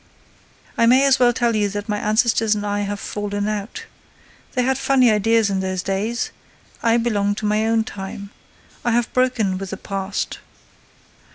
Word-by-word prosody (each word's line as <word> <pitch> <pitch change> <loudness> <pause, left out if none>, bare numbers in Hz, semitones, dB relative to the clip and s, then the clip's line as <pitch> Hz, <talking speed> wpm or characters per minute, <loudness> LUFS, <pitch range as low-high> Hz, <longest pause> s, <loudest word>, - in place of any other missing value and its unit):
"I 230 - +5
may 260 +3 +5
as 275 -1 +4
well 245 -1 +5
tell 235 -1 0
you 205 -1 +1
that 205 +1 -5
my 210 -1 -1
ancestors 220 0 +2
and 205 0 -3
I 205 0 -1
have 205 0 -3
fallen 205 0 -3
out. 215 - -4 0.7
They 250 - +1
had 265 +1 0
funny 260 -4 +4
ideas 215 0 +2
in 195 - 0
those 185 -1 -2
days. 210 +5 -2 0.5
I 230 0 +3
belong 205 -4 0
to 215 - -5
my 215 +1 +1
own 225 0 +2
time. 200 -1 -8 0.5
I 240 - +1
have 235 0 0
broken 235 -7 +1
with 195 -1 -6
the 195 - -5
past." 195 0 -4
215 Hz, 175 wpm, -21 LUFS, 205-235 Hz, 0.7 s, I